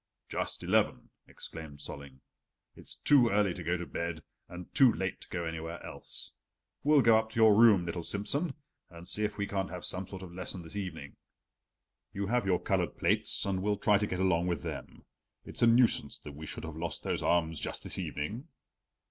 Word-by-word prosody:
"Just - - -3
eleven," - - +1 0.2
exclaimed 80 -3 -7
Solling. 70 -2 -9 0.5
"It's - - -3
too 130 -5 +5
early 100 -3 +2
to 90 - -7
go 85 +2 0
to 90 - -5
bed, 85 -1 -4 0.3
and 90 0 -9
too 130 -3 +7
late 95 -3 -3
to - - -10
go 85 -1 -3
anywhere 80 +1 -5
else. - - -4 0.5
We'll 145 -2 +5
go 115 -1 +7
up 110 0 -4
to 115 - -4
your 110 -1 +7
room, 105 -5 +6
little 85 0 -3
Simsen, 135 - 0 0.3
and 85 0 -11
see 105 - +1
if 105 -1 -4
we 100 - 0
can't 95 -1 -2
have 90 -1 -6
some 95 0 -2
sort 95 -1 -8
of 90 - -9
a - - -13
lesson 90 0 -3
this 80 - -7
evening. 90 -5 -6 1.0
You 100 -1 -2
have 120 0 0
your 90 -2 +3
colored - - -1
plates - - +1
and 95 -2 -1
we'll 105 +1 +1
try 105 0 +3
to 105 - 0
get 90 - -3
along 90 -2 +2
with 85 -5 -1
them. - - -7 0.4
It's - - -6
a 120 - +6
nuisance 115 0 +4
that 75 - -8
we 75 +2 -8
should - - -7
have 80 -1 -6
lost 85 +1 -4
those - - -1
arms 80 -3 +1
just - - -4
this - - -3
evening." 105 - -4
95 Hz, 205 wpm, -31 LUFS, 85-105 Hz, 1.0 s, too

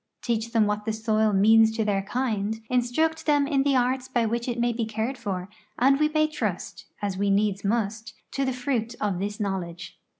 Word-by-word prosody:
Teach 230 -1 -1
them 225 -3 +3
what 210 0 -2
the 220 - -1
soil 220 -1 +1
means 220 +3 +5
to 220 - +1
their 200 -2 +1
kind, 220 -1 -2
instruct 255 +7 0
them 290 -2 +4
in 280 -1 +1
the 275 0 +2
arts 255 +1 +1
by 240 -3 +1
which 235 +2 -2
it 240 -1 -2
may 240 0 +1
be 230 0 -2
cared 220 +4 -2
for, 195 -6 -4 0.3
and 270 +3 +4
we 305 0 +3
may 310 0 +2
trust, 310 0 -4 0.2
as 195 -2 -2
we 200 0 +1
needs 200 0 +1
must, 220 +1 -2 0.2
to 275 - -1
the 260 - 0
fruit 245 -2 -2
of 200 -4 -1
this 205 +2 -3
knowledge. 185 -3 -4
225 Hz, 205 wpm, -26 LUFS, 205-255 Hz, 0.3 s, means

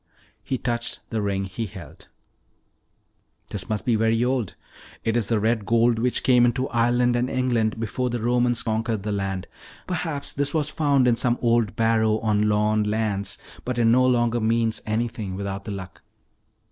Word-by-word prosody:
He 130 - -2
touched 120 -1 -3
the 110 -2 -1
ring 100 -1 -1
he 100 +4 -4
held. 95 -3 -12 1.4
"This - - -4
must 110 -1 -2
be 120 - +2
very 115 +2 +2
old. 125 -6 -1 0.5
It's 115 -2 0
the 115 -2 +1
red 110 0 +1
gold 115 +1 +2
which 125 +1 0
came 125 -2 +5
into 125 +2 +1
Ireland 120 +1 +2
and 120 +1 0
England 120 -4 0
before 125 +3 -2
the 120 0 -2
Romans 120 0 +1
conquered 110 -2 -1
the 105 - -2
land. 95 -2 -2 0.4
Perhaps 160 -5 -3
this 140 +2 -1
was 155 -1 0
found 140 -5 +2
in 120 -1 +3
some 120 0 +1
old 115 -2 +1
barrow 110 -1 +2
on 105 -1 +2
Lorne 105 0 +2
lands. 105 -2 -1 0.3
But 125 -1 -3
it 120 - +3
no 120 +3 +5
longer 120 -1 +2
means 115 0 +1
anything 110 -3 -2
without 100 0 -5
the 105 - -5
Luck." 95 -2 -8
115 Hz, 170 wpm, -24 LUFS, 105-120 Hz, 1.4 s, came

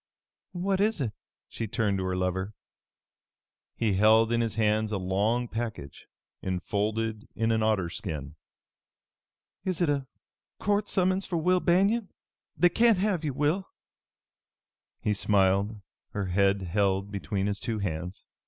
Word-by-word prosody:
"What 190 +2 0
is 215 -1 +2
it?" 125 -6 -1 0.4
She 115 - -5
turned 105 -3 0
to - - -2
her 95 0 -1
lover. 95 +2 -2 1.2
He 110 -3 +1
held 110 +3 +5
in 120 0 +2
his 115 -2 -1
hands 110 0 +1
a 105 - 0
long 100 +6 0
package, 110 -12 -6 0.3
enfolded 105 +4 -2
in 115 +3 +1
an 110 0 +2
otter 110 -5 +2
skin. 80 -5 -5 1.3
"Is 185 -4 -1
it 170 -4 +2
a 140 -2 0 0.5
court 205 0 0
summons 185 +1 +1
for 175 - -1
Will 180 +3 +3
Banion? 195 +5 +2 0.5
They 175 - +5
can't 230 +3 +4
have 190 -4 0
you, 145 -3 -1
Will!" 155 +7 +1 1.3
He 105 - +1
smiled, 100 +1 +2 0.3
her 100 -1 -2
head 100 +1 +2
held 100 +2 0
between 100 -1 -2
his 100 0 -1
two 115 -3 -2
hands. 90 -2 -4
110 Hz, 140 wpm, -28 LUFS, 100-160 Hz, 1.3 s, held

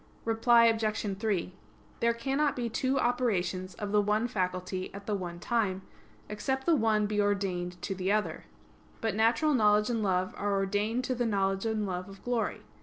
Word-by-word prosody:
Reply 230 +1 +5
Obj. 220 -3 +1
3: 200 -5 -1 0.5
There 235 0 +3
cannot 275 +4 0
be 240 -2 -2
two 260 +4 0
operations 195 -7 0
of 205 -1 -5
the 210 0 +4
one 210 +3 +1
faculty 185 -3 -3
at 200 0 -9
the 210 - -2
one 175 -3 -4
time, 195 -3 0 0.4
except 265 +6 -2
the 335 - +4
one 220 -5 +2
be 210 0 0
ordained 185 -3 -1
to 195 - -2
the 190 +1 -1
other. 215 0 -1 0.5
But 225 -3 -1
natural 230 +8 +3
knowledge 210 -2 +3
and 230 -2 0
love 185 -2 0
are 205 0 0
ordained 205 +5 0
to 255 - -1
the 240 -1 0
knowledge 195 0 0
and 220 -1 -1
love 185 0 -4
of 195 0 -13
glory. 245 -2 -1
210 Hz, 180 wpm, -30 LUFS, 195-230 Hz, 0.5 s, Reply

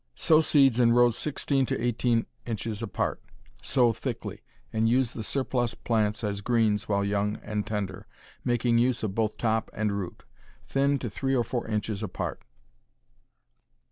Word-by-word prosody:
Sow 160 -1 +4
seeds 135 -6 +4
in 115 -1 +5
rows 120 -1 +5
sixteen 140 -2 0
to - - -1
eighteen 120 0 +1 0.2
inches 110 -1 -3
apart. 115 - -2 0.4
Sow 125 -4 +3
thickly, - - -5 0.3
and 110 0 +2
use 125 0 +2
the 115 - -6
surplus 120 0 -1
plants 105 -2 0
as 100 -1 -2
greens 110 -3 +1
while 100 -1 +1
young 105 +1 0
and 105 -1 -3
tender, 100 -4 -4 0.4
making 120 -1 +2
use 125 -1 +1
of 105 -3 -1
both 110 0 0
top 110 -1 0
and 105 -1 0
root. 95 -4 -5 0.4
Thin 140 +1 +2
to 125 - -4
three 135 +4 -1
or 120 - +3
four 120 +1 -3
inches 105 -1 -2
apart. 105 -4 -4
115 Hz, 155 wpm, -27 LUFS, 105-125 Hz, 0.4 s, in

